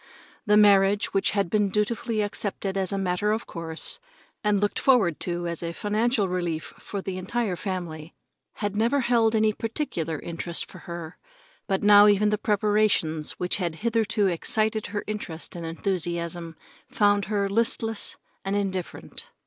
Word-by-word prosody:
The 210 0 +5
marriage, 200 0 +5
which 195 - +2
had 200 -2 +2
been 205 +3 +1
dutifully 215 +2 0
accepted 200 -1 -3
as 190 -2 -1
a 200 - -1
matter 195 +2 0
of 220 +2 -1
course 165 -1 -2 0.4
and 210 -1 +2
looked 205 0 0
forward 220 - +3
to 175 -1 -2
as 170 -1 -3
a 170 0 -3
financial 215 +2 +1
relief 175 -4 -3 0.2
to 200 -2 -3
the 185 -1 -4
entire 210 0 -1
family, 170 -4 -5 0.4
had 205 -1 -3
never 235 +6 +2
held 235 -2 +3
any 215 0 +3
particular 215 - -3
interest 170 +2 -3
for 185 - -13
her, 170 -1 -7 0.5
but 195 -1 0
now 205 0 +8
even 210 +1 +4
the 210 - 0
preparations, 205 -7 +1
which 180 0 0
had 175 -4 -2
hitherto 220 -3 +2
excited 215 +4 0
her 205 +2 -4
interest 195 -7 -5
and 170 -1 -5
enthusiasm, 170 -1 -2 0.3
found 205 -1 +3
her 200 -1 0
listless 225 +1 0 0.3
and 195 +1 -1
indifferent. 190 -3 -4
200 Hz, 155 wpm, -26 LUFS, 175-215 Hz, 0.5 s, now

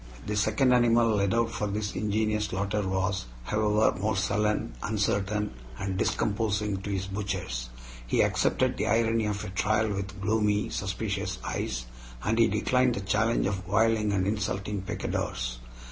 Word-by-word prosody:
The 105 - -2
second 110 +5 +3
animal 120 -1 +4
led 100 -1 +2
out 115 0 +2
for 105 - -2
this 105 +1 -3
ingenious 105 0 0
slaughter 100 +2 -1
was, 95 -6 -1 0.2
however, 105 - +2
more 105 +2 0
sullen, 105 - 0
uncertain, 105 0 0 0.3
and 95 +4 -3
discomposing 105 +1 0
to 100 - -5
his 95 -1 -1
butchers. 95 -12 -3 0.4
He - - +3
accepted - - +1
the - - 0
irony 115 -1 +2
of 105 0 -2
a - - -5
trial 110 +3 +1
with 95 0 -5
gloomy, 105 0 +1
suspicious 100 -1 -2
eyes, - - -2 0.4
and 115 +1 +1
he 115 - +6
declined 125 +4 +2
the 100 - -3
challenge 105 +4 +1
of 95 -1 -2
whirling 110 +1 +2
and 95 -2 +1
insulting 100 -1 -2
picadors. - - -3
105 Hz, 150 wpm, -28 LUFS, 95-110 Hz, 0.4 s, he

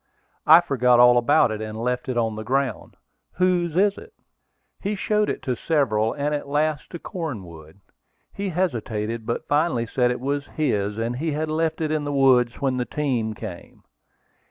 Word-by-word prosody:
"I 160 +3 +9
forgot 125 -5 +3
all 125 0 +7
about 120 -1 +3
it, 110 0 -4
and 110 0 -6
left 125 +2 -2
it 125 - -2
on 110 -2 0
the 110 - -5
ground. 135 -2 -2 0.4
Whose 180 -3 +1
is 200 +1 +2
it?" 450 0 -14 0.7
He 205 +1 -2
showed 210 +1 0
it - - -4
to 125 - -1
several, 115 -7 +1
and 145 +1 -2
at 145 -1 -3
last 150 +1 -1
to 170 - -6
Cornwood. 100 - -7 0.5
He 200 0 -3
hesitated; 115 - -2
but 115 - -3
finally 145 -5 +1
said 125 +2 +1
it 125 - -2
was 140 +2 -2
his, 105 -9 0
and 115 +2 -2
he 155 +2 -2
had 155 +1 -2
left 160 +1 -1
it 155 -1 -1
in 155 -1 0
the 145 - -3
woods 130 -3 +3
when 135 -2 0
the 125 - -1
team 120 -8 -2
came. 100 -5 -9
130 Hz, 180 wpm, -23 LUFS, 115-155 Hz, 0.7 s, I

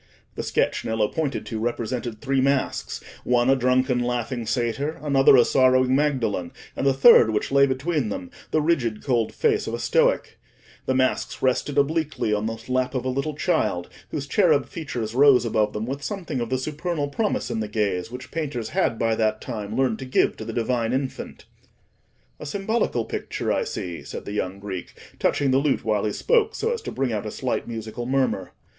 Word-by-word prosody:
The - - -4
sketch - - 0
Nello 110 -1 +1
pointed 150 -4 -2
to 110 - -4
represented 120 0 -3
three 135 -1 +1
masks—one 130 -2 0
a - - +5
drunken 130 0 +2
laughing 120 -1 -2
Satyr, 120 +7 -1
another 135 -2 +5
a 120 - +6
sorrowing 130 -1 +4
Magdalen, 120 -11 0 0.2
and 140 - 0
the 135 - +4
third, 135 - +7
which 110 +3 -1
lay 140 0 +5
between 135 -1 -1
them, 90 -3 -5 0.2
the 155 - +1
rigid, 125 -10 0
cold 120 -5 +1
face 430 -2 +1
of - - -2
a - - -6
Stoic: - - +1 0.5
the 130 - +1
masks 130 0 0
rested 135 +2 +1
obliquely 150 -5 +1
on 105 +1 0
the 115 0 -4
lap 130 +1 0
of 130 -1 -2
a - - 0
little 140 +3 -2
child, 145 - 0 0.2
whose 140 -2 -4
cherub 150 - +3
features 130 -9 -5
rose 135 -1 +6
above 110 -2 +1
them 105 +1 -3
with 135 +3 -4
something 165 - -4
of 120 - -3
the 130 - +1
supernal 155 +3 -2
promise 210 +8 -1
in 115 - -2
the 110 - -2
gaze 100 -4 -1
which 125 +2 -9
painters 140 -8 -3
had 170 -10 0
by 115 0 +1
that 110 -1 +1
time 110 -3 -5
learned 130 -4 +1
to 130 - -6
give 130 - +2
to - - -7
the - - -5
Divine 120 0 0
Infant. 130 0 -4 0.9
"A 150 - -7
symbolical 195 - -1
picture, - - -3
I - - 0
see," 85 -2 -5
said - - -7
the - - -6
young 95 -2 -2
Greek, 95 -3 -7 0.2
touching 140 -2 +2
the 130 - +4
lute 140 -1 0
while 105 -2 +1
he 105 - 0
spoke, 450 - +2
so 460 +2 0
as 470 - -4
to - - -6
bring 130 -3 -1
out 105 0 -3
a - - -2
slight 130 +4 -3
musical 115 +1 -5
murmur. 130 -8 0
130 Hz, 195 wpm, -24 LUFS, 115-145 Hz, 0.9 s, third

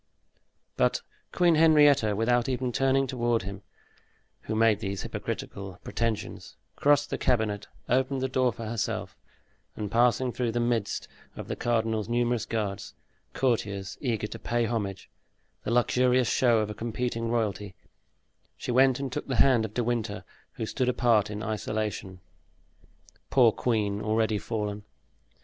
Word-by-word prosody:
But - - +2 0.3
Queen 175 -2 +4
Henrietta, 145 -8 +5
without 120 +3 +2
even 130 -1 -1
turning 135 +2 +2
toward 120 -4 0
him 100 0 -7 0.8
who 110 - -4
made 110 -2 +4
these 100 -3 -4
hypocritical 95 -2 -5
pretensions, 115 -2 -3 0.2
crossed 145 0 +3
the - - -2
cabinet, 110 -5 0 0.2
opened 130 +2 +1
the 130 - +1
door 130 -1 +2
for 115 0 -8
herself 110 0 -3 0.6
and 105 -2 -4
passing 125 +2 +3
through 120 -1 -2
the 120 - 0
midst 120 -3 -1 0.3
of - - -7
the - - -3
cardinal's 115 -2 0
numerous 120 -1 0
guards, 105 -3 -3 0.4
courtiers 100 -6 -1
eager 115 -6 -1
to - - -7
pay 120 0 0
homage, 100 -4 -3 0.6
the - - -1
luxurious 125 +1 +3
show 120 -2 +3
of 105 -1 0
a - - -4
competing 115 +1 -3
royalty, 105 -4 -2 0.8
she - - -4
went 130 +1 +4
and 135 -2 -3
took 150 - -4
the 135 - -1
hand 120 -3 +4
of 110 - -9
De 120 - +1
Winter, 115 -3 -2 0.3
who 110 - -4
stood 125 +3 -1
apart 115 -4 +3
in 105 0 -5
isolation. 105 -3 -3 1.1
Poor 120 -4 +5
queen, 105 -3 -1
already 110 -1 +1
fallen! 105 -2 -3
115 Hz, 145 wpm, -28 LUFS, 105-125 Hz, 1.1 s, Henrietta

